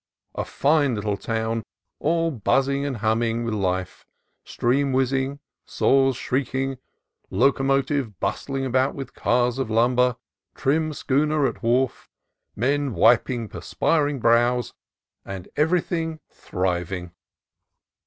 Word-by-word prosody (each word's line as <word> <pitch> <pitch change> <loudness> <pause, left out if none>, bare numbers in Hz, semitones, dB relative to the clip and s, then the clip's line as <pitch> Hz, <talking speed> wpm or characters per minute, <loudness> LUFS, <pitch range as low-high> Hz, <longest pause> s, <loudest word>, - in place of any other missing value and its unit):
a - - -2
fine 145 -3 +2
little 105 -1 -1
town, 115 +1 -2 0.4
all 165 +2 +1
buzzing 135 +3 +1
and 135 -4 -3
humming 115 +1 +1
with 115 -1 -2
life, 95 -3 -2 0.4
steam 135 +3 0
whizzing, 135 +1 0 0.2
saws 135 -1 +2
shrieking, 135 0 -2 0.5
locomotive 135 - +1
bustling 135 +7 -2
about 130 +1 +1
with 135 -2 -7
cars 125 +1 +1
of 130 -4 -2
lumber, 125 +2 +3 0.4
trim 155 +3 +1
schooner 150 +1 +1
at - - -2
wharf, 125 +2 0 0.5
men 140 +1 0
wiping 115 +3 +3
perspiring 145 +4 0
brows, 120 +1 +2 0.5
and 95 -2 -8
every 165 +4 +3
thing 160 -2 -3
thriving. 90 -1 -3
130 Hz, 110 wpm, -24 LUFS, 115-140 Hz, 0.5 s, lumber